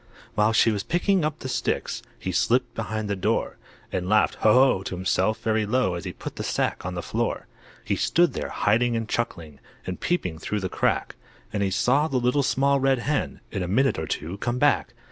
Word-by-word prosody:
While 105 Hz, +1 st, +3 dB
she 115 Hz, 0 st, +4 dB
was 105 Hz, -2 st, -1 dB
picking 180 Hz, -, +1 dB
up 155 Hz, 0 st, -1 dB
the 130 Hz, -, -6 dB
sticks 130 Hz, -, -2 dB, 0.2 s
He 95 Hz, -, -4 dB
slipped 125 Hz, +7 st, +1 dB
behind 110 Hz, -1 st, -3 dB
the 100 Hz, -, -1 dB
door, 95 Hz, -, -1 dB, 0.3 s
And 90 Hz, 0 st, -2 dB
laughed 110 Hz, 0 st, +4 dB
"Ho! 110 Hz, -, +5 dB
Ho!" 130 Hz, -4 st, +5 dB
to 95 Hz, -, -5 dB
himself, 95 Hz, +3 st, 0 dB
very 110 Hz, -1 st, +1 dB
low, 125 Hz, -4 st, +1 dB
As 85 Hz, -2 st, -5 dB
he -, -, -3 dB
put -, -, -8 dB
the -, -, -3 dB
sack -, -, -1 dB
on 90 Hz, +1 st, -4 dB
the 85 Hz, -, -4 dB
floor. -, -, -2 dB, 0.4 s
He -, -, 0 dB
stood 175 Hz, 0 st, +2 dB
there, -, -, -4 dB
hiding 120 Hz, +3 st, +2 dB
and 115 Hz, -1 st, -2 dB
chuckling, 85 Hz, -12 st, -3 dB, 0.3 s
And 90 Hz, -, -5 dB
peeping 90 Hz, -, -1 dB
through 105 Hz, +4 st, -2 dB
the 95 Hz, -, -2 dB
crack, -, -, -1 dB, 0.4 s
And 105 Hz, -, -1 dB
he 100 Hz, -, +1 dB
saw 135 Hz, +10 st, +2 dB
the 135 Hz, -, -1 dB
Little 125 Hz, +3 st, +2 dB
Small 140 Hz, +1 st, +2 dB
Red 135 Hz, 0 st, +3 dB
Hen, 140 Hz, +4 st, -2 dB
In 100 Hz, -, -3 dB
a 90 Hz, -, -2 dB
minute 130 Hz, +3 st, +2 dB
or 80 Hz, -, -4 dB
two, 90 Hz, +6 st, -4 dB
come 120 Hz, +2 st, -1 dB
back. 130 Hz, -3 st, +2 dB
110 Hz, 215 wpm, -25 LUFS, 95-130 Hz, 0.4 s, Ho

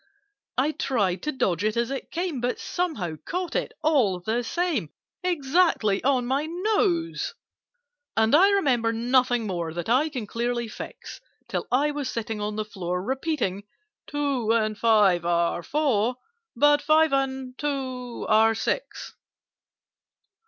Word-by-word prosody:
I 275 Hz, +4 st, +2 dB
tried 205 Hz, -12 st, 0 dB
to 300 Hz, -, -2 dB
dodge 195 Hz, -, 0 dB
it 215 Hz, +1 st, 0 dB
as 235 Hz, +2 st, 0 dB
it 275 Hz, -, -5 dB
came, 340 Hz, -6 st, -3 dB
But 245 Hz, +1 st, -1 dB
somehow 275 Hz, -, -3 dB
caught 360 Hz, 0 st, -3 dB
it, -, -, -1 dB
all 255 Hz, -, +3 dB
the 220 Hz, +6 st, -1 dB
same, 295 Hz, -, -1 dB, 0.3 s
Exactly 305 Hz, -, +2 dB
on 260 Hz, -2 st, +2 dB
my 275 Hz, +5 st, 0 dB
nose. 350 Hz, -1 st, 0 dB, 0.8 s
And 220 Hz, +2 st, +3 dB
I 370 Hz, +7 st, +7 dB
remember 260 Hz, -, +2 dB
nothing 245 Hz, 0 st, +2 dB
more 170 Hz, -5 st, -3 dB
That 175 Hz, +4 st, -4 dB
I 270 Hz, +7 st, +3 dB
can 255 Hz, -7 st, -5 dB
clearly 235 Hz, +2 st, -2 dB
fix, 215 Hz, -, -9 dB, 0.3 s
Till -, -, -3 dB
I 285 Hz, +4 st, +3 dB
was 290 Hz, -3 st, -3 dB
sitting 225 Hz, -2 st, -4 dB
on 210 Hz, 0 st, -2 dB
the 215 Hz, 0 st, -2 dB
floor, 180 Hz, -3 st, -4 dB
Repeating 265 Hz, -, -1 dB, 0.5 s
"Two 280 Hz, -6 st, 0 dB
and 215 Hz, -2 st, +1 dB
five 205 Hz, -6 st, +4 dB
are 170 Hz, 0 st, +1 dB
four, 250 Hz, -, +1 dB, 0.4 s
But 290 Hz, +3 st, +4 dB
five 310 Hz, 0 st, +4 dB
and 265 Hz, -1 st, -1 dB
two 260 Hz, -4 st, -3 dB
are 220 Hz, +1 st, +4 dB
six." -, -, -3 dB
250 Hz, 140 wpm, -25 LUFS, 215-295 Hz, 0.8 s, I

